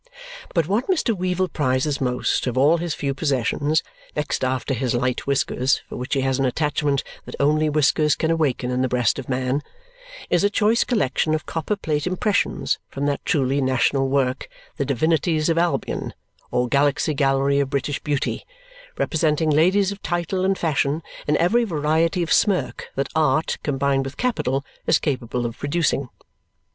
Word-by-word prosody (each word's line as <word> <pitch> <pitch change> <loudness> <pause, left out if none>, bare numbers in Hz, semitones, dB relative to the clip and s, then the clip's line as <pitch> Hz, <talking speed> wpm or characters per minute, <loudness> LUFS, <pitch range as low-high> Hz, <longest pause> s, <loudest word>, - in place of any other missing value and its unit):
But 165 -3 +2
what 210 +7 0
Mr. 315 - +1
Weevle 185 0 -1
prizes 135 0 0
most 125 0 0
of 125 0 -2
all 145 +6 +5
his 170 -2 -3
few 140 -2 -2
possessions 145 +2 0 0.3
(next 150 -3 -2
after 130 +1 -1
his 125 -1 -1
light 125 +2 -1
whiskers, 135 -1 +1
for - - -8
which 125 +3 -3
he 135 - +1
has 135 0 0
an 135 - +2
attachment 145 +1 0 0.2
that - - -8
only 155 +2 +3
whiskers 150 0 +3
can 160 - 0
awaken 140 -6 0
in 125 0 0
the 130 - +2
breast 125 +1 +1
of 135 - -8
man) 130 +2 0 0.7
is 175 0 +2
a 205 - +4
choice 215 +3 +2
collection 155 - +1
of 155 - -4
copper 165 +6 -2
plate 155 -5 -2
impressions 200 +3 0
from 140 +1 -3
that 145 -1 -1
truly 140 -1 +1
national 135 +1 +1
work 130 -1 0 0.3
The 140 - -1
Divinities 155 +4 +1
of 165 0 +2
Albion, 175 0 -1 0.3
or 125 0 0
Galaxy 145 +3 +2
Gallery 140 0 +2
of 140 -2 0
British 140 +1 -2
Beauty, 145 -2 -2 0.5
representing 155 -1 +1
ladies 185 +6 +3
of 200 - -8
title 175 +2 -1
and 190 0 +1
fashion 155 -1 0 0.2
in 150 0 +3
every 225 +8 +3
variety 165 -1 +1
of 165 - +1
smirk 200 -4 +1
that 135 +1 -1
art, 155 -1 +1
combined 135 -1 0
with 135 +1 -7
capital, 145 - -1 0.2
is - - +5
capable 125 -3 -2
of 115 0 -5
producing. 145 -3 0
145 Hz, 170 wpm, -22 LUFS, 135-165 Hz, 0.7 s, all